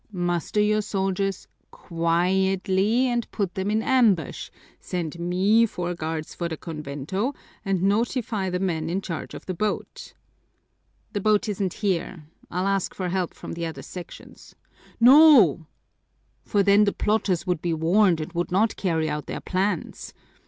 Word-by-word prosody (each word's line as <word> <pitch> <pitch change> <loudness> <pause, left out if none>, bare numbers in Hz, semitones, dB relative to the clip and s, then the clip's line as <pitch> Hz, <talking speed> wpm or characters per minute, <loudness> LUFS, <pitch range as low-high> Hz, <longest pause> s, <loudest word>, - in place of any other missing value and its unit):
Muster 175 +2 -1
your 215 +1 +2
soldiers 195 -1 -2 0.2
quietly 190 +6 +1
and 240 -2 -1
put 195 -5 -3
them 190 +1 -2
in 220 +1 +1
ambush, 220 - +2 0.3
send 170 -2 -4
me 185 +6 +3
four 175 -3 -4
guards 160 -2 -5
for 170 -1 -3
the 160 - -5
convento, 160 - -4 0.3
and 195 -3 -1
notify 215 -1 0
the 180 - -1
men 165 -4 -2
in 180 +3 -1
charge 170 -4 -6
of - - -10
the 185 - -3
boat." 210 +4 -4 1.0
"The 205 - -2
boat 215 +3 +2
isn't 195 -3 -2
here. 180 -3 -2 0.2
I'll 180 +2 -2
ask 195 -1 -1
for 185 -2 -3
help 185 -1 -2
from - - -8
the 170 0 -3
other 145 -5 -8
sections." 180 +4 -11 0.4
"No, 240 - +7 0.8
for 205 -2 +1
then 200 +1 +5
the 200 - 0
plotters 210 -5 0
would 180 -4 -1
be 170 -2 -1
warned 170 +2 +3
and 155 +3 -6
would 175 0 -2
not 210 +4 +2
carry 160 -4 0
out 150 -1 -4
their - - -4
plans. 185 -1 -3
190 Hz, 150 wpm, -24 LUFS, 170-210 Hz, 1.0 s, No